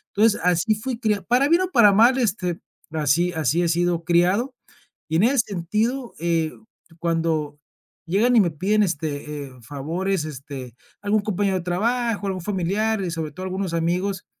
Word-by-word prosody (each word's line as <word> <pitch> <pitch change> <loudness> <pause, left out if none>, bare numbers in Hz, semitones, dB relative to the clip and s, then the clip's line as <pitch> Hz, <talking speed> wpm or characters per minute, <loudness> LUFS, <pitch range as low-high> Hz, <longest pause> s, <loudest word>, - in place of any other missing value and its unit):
Entonces, 215 +1 +4
así 180 +4 +2
fui 230 +2 -4
criado 215 -4 0
para 250 +4 +3
bien 340 +3 +4
o 370 - -3
para 210 -7 +6
mal, 235 +6 +5
este, 185 -7 -1 0.3
así 160 +3 +1
así 160 0 +1
he 170 - +1
sido 170 0 +1
criado 180 +9 +2 0.6
y 160 - -1
en 185 - +3
ese 255 +3 +3
sentido, 220 +6 -1
eh, 165 -1 0 0.5
cuando 165 -3 -1 0.5
llegan 225 +8 +3
y 225 - +7
me 175 -4 +1
piden, 205 +7 +1
este, 150 -4 -3
eh, - - -14
favores, 160 - -2
este, 135 -4 -8 0.3
algún 205 +1 +1
compañero 200 -1 0
de 180 - -5
trabajo, 220 +4 -1
algún 190 -1 -3
familiar 205 +4 -1
y 180 - -2
sobre 160 -2 -4
todo, 185 - -7
algunos 190 -1 -3
amigos, 180 +3 -1
185 Hz, 165 wpm, -23 LUFS, 165-215 Hz, 0.6 s, y